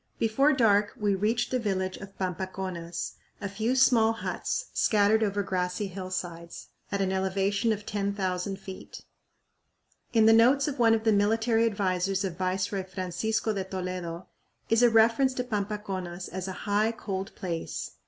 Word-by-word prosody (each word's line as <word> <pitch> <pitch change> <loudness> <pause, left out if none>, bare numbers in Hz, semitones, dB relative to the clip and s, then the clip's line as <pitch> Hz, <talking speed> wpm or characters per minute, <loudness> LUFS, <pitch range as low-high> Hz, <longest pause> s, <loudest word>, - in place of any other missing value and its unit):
Before 250 +7 +3
dark 210 -6 +3
we 205 -1 +2
reached 220 +5 0
the 255 - +1
village 190 -4 -1
of 195 0 -11
Pampaconas, 185 -1 -4 0.2
a 200 - -3
few 220 +6 -1
small 235 -4 +5
huts - - -3
scattered 215 +1 +3
over 205 -1 0
grassy 180 +1 -2
hillsides, 180 -3 -6 0.2
at 200 - 0
an 190 -1 +1
elevation 195 +3 +1
of 210 -1 -3
10,000 195 -2 -2
feet. 190 -1 -10 1.1
In 225 -2 +4
the 225 - +7
notes 255 +6 +5
of 285 -3 -4
one 225 -1 +5
of 220 - -3
the 225 - +4
military 225 +3 +2
advisers 195 -2 0
of 180 -3 -4
Viceroy 190 +2 -1
Francisco 190 +4 -2
de 195 -2 -2
Toledo 185 -2 -5 0.5
is 225 +1 +4
a 240 - +7
reference 230 +4 +4
to 250 - -1
Pampaconas 200 -5 -4
as 185 +1 -5
a - - -3
"high, 210 +2 +2
cold 195 -4 -5
place." 170 -3 -4
200 Hz, 155 wpm, -28 LUFS, 185-225 Hz, 1.1 s, the